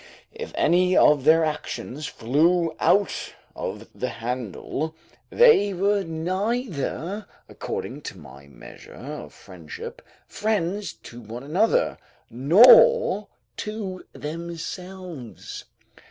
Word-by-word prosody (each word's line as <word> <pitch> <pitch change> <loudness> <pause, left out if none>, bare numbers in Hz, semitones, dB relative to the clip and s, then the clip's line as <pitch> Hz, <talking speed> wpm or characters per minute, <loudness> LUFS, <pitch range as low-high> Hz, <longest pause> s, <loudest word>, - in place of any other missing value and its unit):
If 465 +1 -7
any 180 +1 +3
of 145 -3 +5
their 160 +1 +6
actions 150 -1 -4
flew 160 +7 +1
out 200 +1 +1 0.2
of - - -5
the - - -3
handle, 125 - -4 0.3
they 330 - +5
were 200 +2 +2
neither 185 - -3 0.2
(according 140 +4 -6
to - - -14
my 70 -3 -14
measure 70 - -13
of - - -8
friendship) 90 -6 -10 0.2
friends 205 -2 -2
to 120 +1 -10
one 115 +3 -8
another, 185 +11 +1 0.3
nor 240 - +6 0.3
to 210 -4 -5
themselves. 170 -2 -7
170 Hz, 95 wpm, -24 LUFS, 140-200 Hz, 0.3 s, their